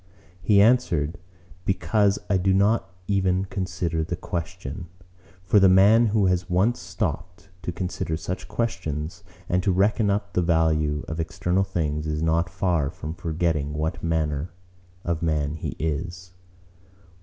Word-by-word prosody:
he 100 +2 +4
answered, 90 -9 +3 0.4
'Because 95 +2 +2
I 100 - +2
do 95 +1 +2
not 100 0 +2 0.2
even 95 -1 +1
consider 90 -4 -2
the 85 +2 -3
question.' 85 -1 -5 0.6
For 95 +3 +4
the 95 -1 +6
man 105 +5 +6
who 105 -1 +2
has 90 -1 +1
once 95 +7 +2
stooped 90 +2 -4
to - - -3
consider 90 -2 -3
such 90 +4 -5
questions, 80 -9 -3 0.2
and 90 +1 +1
to 95 - +1
reckon 100 +3 +2
up 100 0 -1
the 90 - +2
value 80 -3 +1
of 80 - -4
external 90 +3 0
things, 80 -5 -2
is 75 +1 -2
not 85 +2 +1
far 85 -5 0
from 75 +3 -6
forgetting 80 -3 -1
what 80 +2 -2
manner 80 -1 -1 0.5
of 85 -1 -2
man 75 -3 0
he 80 - -5
is. 85 +3 -4
90 Hz, 145 wpm, -25 LUFS, 80-95 Hz, 0.6 s, the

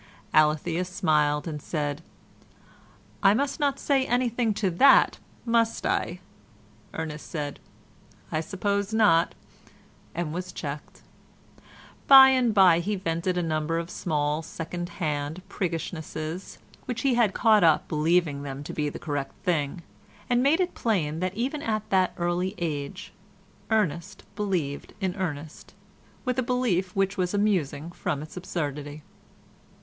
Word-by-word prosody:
Alethea 155 +3 +3
smiled 155 -5 +1
and 150 -2 -5
said, 145 -1 -3 1.2
"I 200 0 +5
must 280 +4 -1
not 280 -2 +1
say 275 -2 +1
anything 245 -2 +1
to 195 -3 0
that, 265 +11 +5 0.3
must 230 -1 +1
I?" 175 +1 -1 0.7
Ernest 155 -2 -5
said, 145 -4 -4 0.7
"I 155 - 0
suppose 200 +4 -2
not," 200 -7 +4 0.8
and 165 -2 -2
was 180 +1 -4
checked. 145 -1 -7 1.0
By 270 -1 +10
and 255 -3 +3
by 185 -5 +6
he 205 +5 -1
vented 180 0 -1
a 175 - +1
number 155 0 -1
of 170 +1 -4
small 150 -2 -1
second 175 +2 -6
hand 150 0 -2
priggishnesses 165 -1 -4 0.3
which 245 -2 -3
he 270 -2 +2
had 235 -5 +2
caught 220 -3 +5
up 160 -2 +4
believing 155 -2 +1
them 140 0 -6
to - - -7
be 150 -1 -1
the - - -7
correct 145 -2 -4
thing, 170 -2 -1 0.4
and 245 0 +2
made 285 +6 +3
it 365 -1 0
plain 165 -9 -1
that 185 +1 -2
even 265 +6 -2
at 215 -1 -2
that 185 -1 +2
early 175 +3 -1
age 145 -4 -4 0.6
Ernest 195 -3 -1
believed 180 -9 -2
in 190 -3 -1
Ernest 160 -5 -5 0.5
with 255 0 0
a - - +3
belief 235 -8 0
which 195 +1 0
was 180 +1 0
amusing 170 -7 0
from 145 -4 -3
its 155 - -11
absurdity. 150 -4 -4
175 Hz, 135 wpm, -26 LUFS, 155-210 Hz, 1.2 s, By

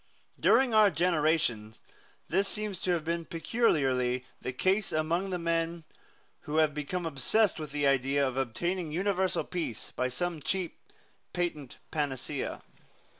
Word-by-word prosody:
During 260 -3 +4
our 215 -1 +7
generation 155 - +1 0.5
this 195 +4 +2
seems 210 -2 -1
to 185 - 0
have 165 -3 -1
been 170 +1 -1
peculiarly 135 - +1 0.2
the - - -3
case 190 +9 +1
among 165 +5 0
the 180 - -1
men 165 0 -1 0.6
who 150 +1 -4
have 155 -2 +4
become 150 +5 -3
obsessed 165 - +2
with 155 -2 -6
the 145 0 0
idea 140 +1 +3
of 130 - -4
obtaining 160 +7 -2
universal 190 +2 +1
peace 165 -11 -4
by 125 - +1
some 160 +5 -3
cheap 185 +2 -2 0.5
patent 160 -7 -3
panacea. 145 -2 -3
165 Hz, 135 wpm, -30 LUFS, 140-180 Hz, 0.6 s, our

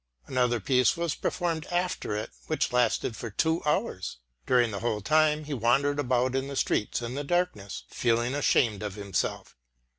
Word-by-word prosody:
Another 125 -2 +1
piece 125 - +3
was 170 -2 0
performed 165 -3 -2
after 175 -11 -1
it 105 - -4 0.2
which - - 0
lasted 125 -1 +1
for 115 - -5
two 160 - +1
hours. 150 - -1 0.3
During 120 -3 +3
the 100 - -4
whole 110 -1 -1
time 155 +5 +3
he 150 0 -5
wandered 140 +4 +2
about 125 -2 +1
the 135 +1 -2
streets 115 -1 0
in 120 +1 -4
the 145 +2 -3
darkness, 160 - -1
feeling 120 +1 0
ashamed 120 -7 +2
of 105 -2 -4
himself. 100 -2 -3
125 Hz, 160 wpm, -28 LUFS, 115-150 Hz, 0.3 s, piece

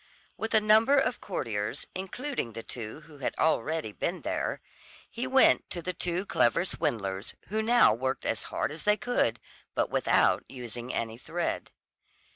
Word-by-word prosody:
With 220 0 -2
a - - +8
number 220 +6 +5
of 270 -2 +1
courtiers, 110 - -3
including 195 - -4
the 115 +1 -6
two 115 +4 -7
who 150 -2 -15
had 130 - -2
already 155 -4 +1
been - - -3
there, - - -1 0.5
he 245 +2 -3
went 265 +1 +5
to 175 - -4
the 185 - -2
two 180 +2 -2
clever 120 - +3
swindlers, 105 - -2
who 215 +2 0
now 235 - +6
worked 130 +3 -2
as 110 - 0
hard - - -1
as 155 - -6
they 210 0 +3
could, 200 - +1 0.4
but - - +1
without - - +3
using 120 -1 -6
any 115 0 -3
thread. 175 +5 -3
160 Hz, 160 wpm, -29 LUFS, -, 0.5 s, a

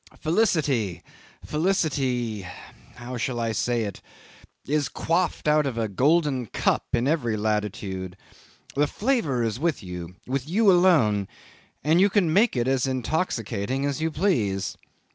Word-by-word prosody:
Felicity, 150 - +1 0.4
felicity 135 - 0 0.5
how 125 +1 -6
shall 120 +1 -2
I 115 -1 0
say 120 +1 0
it? 100 -3 -6 0.6
is 145 +1 0
quaffed 170 -1 -1
out 150 -1 +4
of 125 -4 -4
a 115 -1 0
golden 135 - +2
cup - - 0
in 120 +2 +2
every 125 -8 0
latitude: 100 -3 -2 0.6
the 145 +1 +2
flavour 200 - 0
is 115 +1 -2
with 160 -6 -1
you 90 -1 -7
with 135 +2 -3
you 205 +3 +4
alone, 150 - +4 0.6
and 160 +5 +4
you 200 - +5
can 185 -6 +2
make 210 - +3
it 120 +1 +1
as 135 -1 +1
intoxicating 130 - -1
as 145 +1 -2
you 160 - +1
please. 120 - 0
130 Hz, 140 wpm, -25 LUFS, 110-160 Hz, 0.6 s, you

